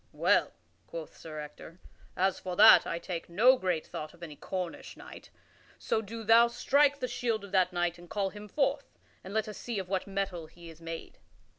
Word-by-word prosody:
"Well," - - +2 0.3
quoth 165 -2 -8
Sir 155 -2 -8
Ector, 150 +3 -10 0.4
"as 190 0 +1
for 180 -1 -5
that 215 +3 +8
I 170 - -2
take 170 -1 -6
no 230 +10 +5
great 180 -8 -1
thought 155 0 -7
of 170 - -15
any 155 -3 -8
Cornish 180 +2 -6
knight, - - -12 0.5
so 220 - -1
do 225 +2 -8
thou 230 +2 +6
strike 280 +4 +2
the 250 - -2
shield 235 -3 -2
of 200 - -13
that 185 -1 +3
knight 175 -1 -1
and 175 0 -14
call 200 -2 -1
him 210 0 -10
forth, 275 +3 -1 0.3
and 190 - -9
let 220 +1 -1
us 210 - -8
see 235 -3 -4
of 190 -2 -4
what 190 +1 -1
mettle 195 -4 -3
he 170 +1 -13
is 160 +1 -17
made." 165 0 -8
190 Hz, 200 wpm, -30 LUFS, 170-220 Hz, 0.5 s, that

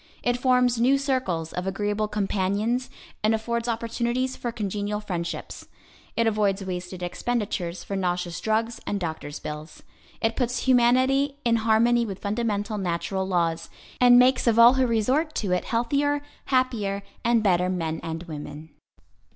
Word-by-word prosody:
It 245 - +2
forms 250 -1 +2
new 265 +3 +4
circles 255 - -1
of 180 +1 -3
agreeable 205 +2 -1
companions, 210 +4 -1 0.3
and 215 +1 +3
affords 235 +1 -2
opportunities 235 +2 -1
for 240 - -4
congenial 210 -2 -3
friendships. 175 -5 -5 0.5
It 230 - +3
avoids 205 -3 +1
wasted 180 0 -5
expenditures 180 -3 -2
for 200 - -5
nauseous 180 -2 -2
drugs 225 +1 0
and 205 - -1
doctor's 160 -4 -5
bills. 150 +1 -8 0.4
It 225 0 0
puts 245 -2 -1
humanity 260 +3 +3
in 230 -1 +3
harmony 230 +2 +3
with 200 -5 -5
fundamental 210 0 -2
natural 190 +1 -2
laws, 165 -3 0 0.3
and 245 -1 +7
makes 255 0 +4
of 230 -1 +4
all 235 +2 +9
who 260 -1 +2
resort 255 +8 +1
to 200 -4 -1
it 180 - 0
healthier, 285 +5 0 0.2
happier 225 -7 0 0.2
and 235 -1 +3
better 180 -2 +2
men 165 -3 -2
and 165 +1 -5
women. 150 -1 -8
215 Hz, 145 wpm, -25 LUFS, 185-240 Hz, 0.5 s, all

